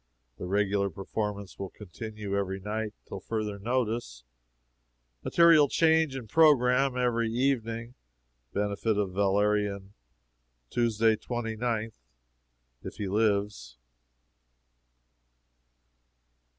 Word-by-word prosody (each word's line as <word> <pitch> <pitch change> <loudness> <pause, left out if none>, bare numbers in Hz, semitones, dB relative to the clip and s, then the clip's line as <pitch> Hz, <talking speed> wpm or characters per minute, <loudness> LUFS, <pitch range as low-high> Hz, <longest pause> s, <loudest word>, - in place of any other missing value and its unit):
The 90 - -5
regular 100 0 +1
performance 100 +2 -5
will 95 -1 -4
continue 105 +1 -7
every 95 -1 -2
night 105 +2 -4
till 100 - -6
further 105 0 -4
notice. 115 - -2 1.0
Material 165 -4 +6
change 160 -1 +3
of 125 -4 -6
programme 135 -2 +4
every 115 -2 +1
evening. 115 -1 -1 0.6
Benefit 105 +1 -1
of 100 -2 0
Valerian, 100 0 0 0.8
Tuesday, 115 -2 +2
29th, 115 -1 -3 0.9
if - - -8
he 105 -2 -4
lives." 100 - 0
110 Hz, 85 wpm, -28 LUFS, 100-120 Hz, 1.0 s, Material